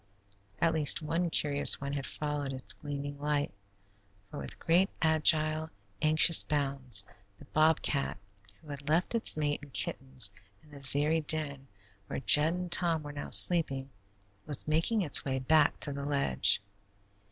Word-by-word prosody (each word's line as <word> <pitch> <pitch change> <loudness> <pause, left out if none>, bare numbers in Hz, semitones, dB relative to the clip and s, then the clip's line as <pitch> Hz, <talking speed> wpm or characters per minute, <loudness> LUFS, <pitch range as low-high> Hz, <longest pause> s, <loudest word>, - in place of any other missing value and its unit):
At 165 +6 0
least 155 0 +4
one 165 +3 -2
curious 145 -2 +2
one 140 0 -6
had 135 -3 -5
followed 145 -2 -5
its 130 -1 -1
gleaming 145 -1 -8
light, 145 -3 -3 0.8
for - - -8
with 70 - -9
great, 180 +4 +1
agile, 155 -1 +1 0.3
anxious 155 +1 +5
bounds, 135 -8 -1 0.3
the - - -16
bobcat, 155 -5 0 0.5
who 155 - -16
had 145 0 -8
left 165 +7 +1
its 230 -8 0
mate 145 -1 -2
and 145 -1 -14
kittens 130 -5 -1 0.3
in 150 - -22
the 145 - -12
very 145 +4 -1
den 145 -3 0 0.4
where - - -5
Jud 150 +4 +5
and 180 -1 -6
Tom 165 -4 +3
were 145 0 -9
now 145 - -8
sleeping, 140 -6 +3 0.6
was 145 -1 0
making 165 +8 0
its 150 - +2
way 135 -1 -3
back 150 +3 +1
to 145 - +1
the 140 0 -7
ledge. 140 - 0
145 Hz, 155 wpm, -29 LUFS, 140-160 Hz, 0.8 s, anxious